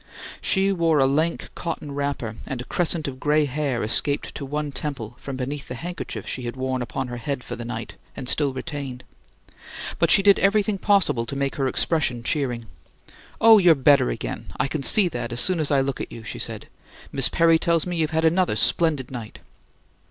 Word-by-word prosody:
She 195 +1 +2
wore 165 -4 +2
a 135 - +4
lank 155 +5 0
cotton 165 -4 -5
wrapper, 140 -6 -3
and 130 - -4
a - - -4
crescent 170 -3 -1
of 130 -1 -6
gray 150 +1 +2
hair 140 -3 -2
escaped 140 +6 +1
to 140 - -6
one 150 +1 -3
temple 130 -5 -5
from 135 -2 -6
beneath 135 +2 -5
the 125 - -6
handkerchief 175 +8 -6
she 130 - -3
had 120 - -4
worn 130 -1 -2
upon 130 +2 -4
her 120 - -5
head 130 +1 -4
for 120 - -6
the 120 -1 -7
night 115 -1 -6 0.2
and 130 - -6
still 140 +1 +2
retained; 130 -2 -6 1.0
but - - +3
she 195 - +6
did 200 0 +6
everything 200 0 +2
possible 185 - +2
to 140 - -5
make 140 0 -1
her 135 -2 +1
expression 130 -4 0
cheering. 120 -4 -1 0.7
"Oh, 225 -1 +8
you're 175 -4 +6
better 140 - +4
again! - - -5
I - - +2
can 150 +1 -3
see 190 +8 +6
that, 120 -7 -5
as 120 - -1
soon 175 +7 +3
as 155 - +1
I 140 -2 +3
look 135 -1 -3
at - - -6
you," 115 - -9
she - - -7
said. - - -4 0.4
"Miss 135 -1 +4
Perry 165 -1 +4
tells 165 -1 +1
me 175 -1 -3
you've 155 -2 +1
had 160 0 0
another 175 - +2
splendid 140 +3 +2
night." 120 -4 -7
140 Hz, 205 wpm, -23 LUFS, 125-165 Hz, 1.0 s, Oh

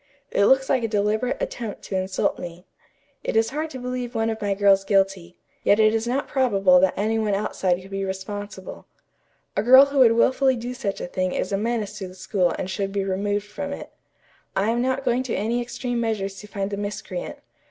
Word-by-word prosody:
It 200 - +3
looks 265 0 +4
like 255 -3 +1
a - - +1
deliberate 215 +3 0
attempt 230 -4 -5
to 195 - -5
insult 185 0 0
me. 175 +1 -8 0.6
It - - -2
is 225 0 +3
hard 310 +3 -3
to 265 - -7
believe 250 -1 -4
one 225 0 +1
of 220 -1 -6
my 200 -1 0
girls 195 -1 +4
guilty, 195 -3 0 0.3
yet 205 - +4
it 215 0 +5
is 225 +1 -1
not 270 +4 -1
probable 195 -9 +4
that 185 0 +2
any 220 +2 +1
one 210 -2 +1
outside 185 -3 0
could 195 - -14
be 195 0 -2
responsible. 205 - -6 0.7
A - - +2
girl 260 +5 +8
who 280 0 -1
would 235 -3 +7
wilfully 260 +3 +3
do 245 +1 -5
such 230 -6 -3
a - - -3
thing 185 0 -1
is 185 - -2
a - - +1
menace 215 -2 -2
to 190 - -5
the 185 - -12
school 185 -1 0
and 185 - -3
should 195 +1 -2
be 200 0 -1
removed 200 +2 -1
from 280 +8 -6
it. - - -8 0.6
I 205 +4 +2
am 240 +1 0
not 260 +2 -1
going 245 0 +2
to 255 -2 -3
any 230 +4 0
extreme 240 0 -3
measures 200 -4 -2
to 210 - -10
find 200 -1 -3
the 200 - -3
miscreant. 205 - -5
210 Hz, 215 wpm, -24 LUFS, 195-245 Hz, 0.7 s, girl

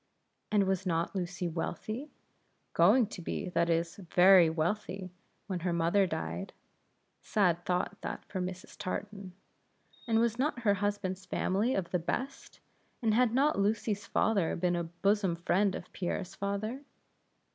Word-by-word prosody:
And 210 -2 +4
was 190 0 -1
not 165 -1 0
Lucy 180 -1 -2
wealthy? 215 - -4 0.6
going 250 -3 +5
to 205 -3 -8
be, 180 - -3
that 170 -1 +1
is, 165 0 0
very 180 -1 +6
wealthy 185 +3 -2 0.3
when 185 -3 -3
her 175 +1 -1
mother 170 +4 +3
died; 85 - -4 0.7
(sad 175 -5 +1
thought 180 +3 -1
that - - -5
for 185 - -4
Mrs. 180 0 -6
Tartan) 195 0 -5 0.7
and 225 -1 +3
was 235 0 +1
not 265 -3 0
her 205 -3 +4
husband's 195 -2 -2
family 210 +8 +1
of 180 -3 -2
the 180 - +1
best; 250 +11 -4 0.4
and 220 -2 +3
had 245 0 +4
not 275 +1 +2
Lucy's 210 0 0
father 200 -7 +1
been 175 0 +1
a 170 -1 -1
bosom 190 +2 +1
friend 185 +3 +1
of 180 - -9
Pierre's 180 0 -3
father? 200 +6 -3
190 Hz, 145 wpm, -31 LUFS, 175-210 Hz, 0.7 s, very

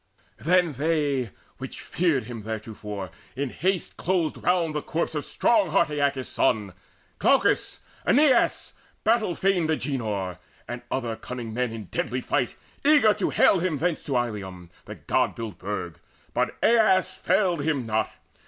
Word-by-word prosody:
Then 170 +4 +3
they, 145 -3 0 0.3
which - - -7
feared 165 -7 +1
him 115 0 -7
theretofore, 105 -3 -6 0.2
in 135 -1 -2
haste 185 +1 -1
Closed 170 -3 0
round 175 -3 +2
the 150 - -1
corpse 165 +2 -2
of 150 -2 -2
strong 215 -6 +2
heart 155 0 +2
Aeacus' 140 -3 0
son, 100 -4 +1 0.5
Glaucus, - - +2 0.2
Aeneas, 270 -3 +3 0.3
battle 220 -6 +2
fain 185 -4 +2
Agenor, 110 - -2 0.3
And 120 0 -5
other 120 -4 -2
cunning 120 -1 -6
men 125 0 -1
in 115 -1 -6
deadly 120 +6 -2
fight, - - -1 0.3
Eager 285 -7 +6
to 205 -1 -1
hale 190 - +4
him 170 -3 0
thence 170 +2 -1
to 135 -3 0
Ilium 95 -7 -4
The - - -8
god - - 0
built 110 -6 -6
burg. 90 -5 -5 0.3
But - - 0
Aias 215 -5 +4
failed 180 -6 +1
him 145 -4 0
not. 110 -1 0
140 Hz, 145 wpm, -26 LUFS, 110-180 Hz, 0.5 s, Eager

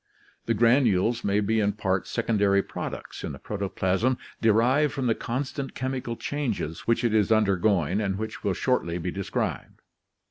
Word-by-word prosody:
The 115 - +2
granules 115 -1 +3
may 100 +1 +2
be 110 +2 +1
in 100 -1 +1
part 95 -2 -1
secondary 100 -4 +2
products - - -6
in - - -4
the - - -8
protoplasm 100 +4 -1 0.2
derived 120 +7 +3
from 135 -2 -2
the 115 - +3
constant 135 +4 -4
chemical 130 -2 -3
changes 115 - -3
which 115 +1 +2
it 115 -2 +2
is 105 -1 +3
undergoing 100 -3 +2
and 95 -2 -1
which 110 +1 -5
will 100 -3 0
shortly 90 -6 0
be 90 +1 -3
described. 95 +1 -3
110 Hz, 155 wpm, -26 LUFS, 100-120 Hz, 0.2 s, granules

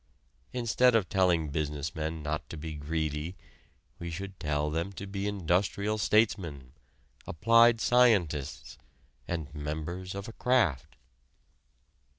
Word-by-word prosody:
Instead 125 0 +3
of 105 -5 +2
telling 90 -5 +2
business 75 +1 -3
men 80 -1 -4
not 75 0 -3
to 80 - -7
be 80 +1 -6
greedy, 75 +3 -3 0.6
we 85 - -5
should 95 +2 -7
tell 75 -2 -1
them 85 +5 -2
to 100 +1 -7
be 100 0 -3
industrial 100 +3 0
statesmen, 85 - +1 0.5
applied 115 +6 +5
scientists, 100 - +2 0.5
and 80 -4 -4
members 80 +5 -5
of 100 +1 -5
a 115 - -8
craft. 100 - +1
85 Hz, 120 wpm, -29 LUFS, 75-100 Hz, 0.6 s, applied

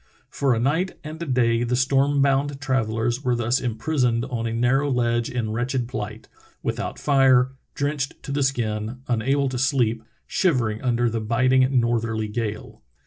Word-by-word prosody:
For 135 -3 +1
a - - -1
night 160 +10 0
and 155 +2 -8
a 170 - -4
day 120 -3 +2
the 120 +1 0
storm 135 +2 +2
bound 140 0 +1
travellers 120 -2 -1
were 125 -2 +1
thus 120 +2 +1
imprisoned 120 0 0
on 120 -3 -3
a - - -3
narrow 125 +5 +1
ledge 120 -2 +1
in 115 -3 -2
wretched 120 +2 -1
plight 110 -2 -6 0.2
— - - -32
with - - -2
out - - -4
fire, 130 -3 +4 0.2
drenched 140 -1 -2
to - - -6
the 145 +1 0
skin, 120 -2 -2
unable 135 +4 +1
to 130 -1 -3
sleep, 120 -4 +1 0.2
shivering 120 - 0
under 120 -1 +1
the 115 -1 -1
biting 130 +3 +3
northerly 115 -2 -1
gale. 110 -1 -5
125 Hz, 170 wpm, -23 LUFS, 115-135 Hz, 0.2 s, fire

